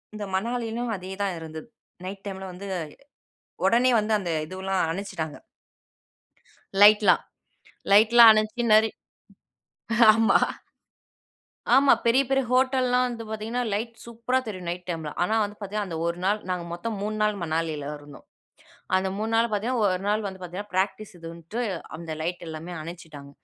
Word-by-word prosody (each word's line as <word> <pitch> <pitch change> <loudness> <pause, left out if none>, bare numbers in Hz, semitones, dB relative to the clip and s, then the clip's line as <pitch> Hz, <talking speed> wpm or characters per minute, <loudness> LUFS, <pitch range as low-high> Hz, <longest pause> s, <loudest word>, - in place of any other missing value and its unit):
இந்த 210 -1 -5
மணாலியும் 235 +2 -2
அதே 185 +1 -8
தான் 195 -3 -1
இருந்தது. 160 +2 -8 0.4
நைட் 195 +1 -7
டைம்ல 190 -1 -6
வந்து 185 +3 -9 1.0
உடனே 245 +2 +4
வந்து 215 +1 -1
அந்த 185 -3 -5 0.2
இதுவெல்லாம் 190 +1 -2
அனுச்சுட்டாங்க. 165 -4 -5 1.5
லைட்லாம், 210 0 +6 0.7
லைட்லாம் 225 +2 +8
அனைஞ்சி 215 +3 0
நறை 220 +1 +5 1.2
ஆமா. 225 0 +4 1.4
ஆமா 275 +1 +6
பெரிய, 255 +4 +5
பெரிய 270 0 +2
ஹோட்டல்லலாம் 255 -1 +2
வந்து 230 -2 -6
பார்த்தீங்கன்னா, 220 +3 -3
லைட் 230 +3 -3
சூப்பரா 235 +2 -1
தெரியும் 185 -4 -6
நைட் 180 +1 -6
டைம்ல. 160 -3 -4
ஆனா, 215 +5 +1
வந்து 205 0 -7
பார்த்தீங்கன்னா 205 0 -3
அந்த 165 - -4
1 170 +1 -2
நாள் 210 +2 +1
நாங்க 180 -1 -2
மொத்தம் 220 +5 -4
3 215 +1 -3
நாள் 210 -2 0
மணாலில 155 -3 -2
இருந்தோம். 145 0 -14 0.7
அந்த 190 0 0
3 215 +2 -2
நாள் 230 +1 +3
பார்த்தீங்கன்னா 230 +4 0
1 185 -1 0
நாள் 210 +1 +1
வந்து 190 -1 -6
பார்த்தீங்கன்னா, 185 +4 -7
பிராக்டிஸ் 195 +2 -1
இதுன்ட்டு 170 +6 -7 0.4
அந்த 165 0 -7
லைட் 175 +2 -3
எல்லாமே 160 +2 -7
அனைச்சிட்டாங்க. 155 -4 -10
205 Hz, 140 wpm, -25 LUFS, 175-225 Hz, 1.5 s, லைட்லாம்